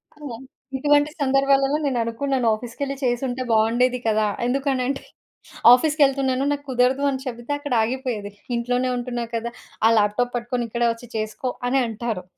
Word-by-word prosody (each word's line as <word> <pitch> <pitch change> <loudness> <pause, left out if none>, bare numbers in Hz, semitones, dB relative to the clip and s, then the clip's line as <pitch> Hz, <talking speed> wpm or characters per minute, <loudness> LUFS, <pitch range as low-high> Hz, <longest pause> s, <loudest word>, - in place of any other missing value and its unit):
ఆ! - - -22 0.6
ఇటువంటి 290 +2 +3
సందర్భాలలో 275 +1 +3
నేననుకున్నాను 250 0 0
ఆఫీస్‌కెళ్లి 250 +5 -5
చేసుంటే 245 +1 -1
బావుండేది 240 +3 +3
కదా! 215 -1 +2 0.2
ఎందుకనంటే 270 +1 0 0.7
ఆఫీస్‌కెళ్తున్నాను 275 -2 +2
నాకు 285 0 -2
కుదరదు 255 +2 +2
అని 265 -1 -2
చెబితే 240 +1 -6
అక్కడ 290 -2 -4
ఆగిపోయేది. 235 -4 -3 0.2
"ఇంట్లోనే 245 +2 0
ఉంటున్నావు 240 -1 -4
కదా! 230 +1 -2 0.4
ఆ - - +7
ల్యాప్‌టాప్ 215 +4 +1
పట్టుకొని 240 0 -2
ఇక్కడే 235 +1 +1
ఒచ్చి 230 +1 -13
చేసుకో" 215 +4 -3 0.2
అని 270 +2 +2
అంటారు. 225 -3 -4
250 Hz, 130 wpm, -23 LUFS, 235-270 Hz, 0.7 s, ఆ